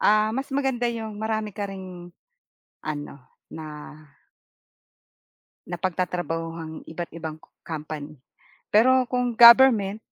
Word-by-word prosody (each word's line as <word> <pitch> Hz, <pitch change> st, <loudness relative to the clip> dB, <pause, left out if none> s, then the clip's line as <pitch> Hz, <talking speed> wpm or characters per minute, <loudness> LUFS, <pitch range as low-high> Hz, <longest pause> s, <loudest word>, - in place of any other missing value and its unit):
ah, 215 Hz, +1 st, +3 dB
mas 270 Hz, +4 st, -3 dB
maganda 265 Hz, -3 st, 0 dB
yung 220 Hz, -2 st, -5 dB
marami 220 Hz, -1 st, -2 dB
ka 200 Hz, 0 st, -4 dB
ring, 185 Hz, -2 st, -9 dB, 0.7 s
ano, 145 Hz, -2 st, -5 dB, 0.4 s
na 160 Hz, -, -7 dB, 2.0 s
napagtatrabahuhang 165 Hz, -2 st, -4 dB
iba't 170 Hz, +1 st, -6 dB
ibang 160 Hz, -1 st, -7 dB
co -, -, -22 dB, 0.2 s
company, 155 Hz, -1 st, -6 dB, 0.6 s
pero 255 Hz, +4 st, +5 dB
kung 250 Hz, -1 st, 0 dB
government 235 Hz, -4 st, +7 dB
195 Hz, 100 wpm, -24 LUFS, 165-235 Hz, 2.0 s, government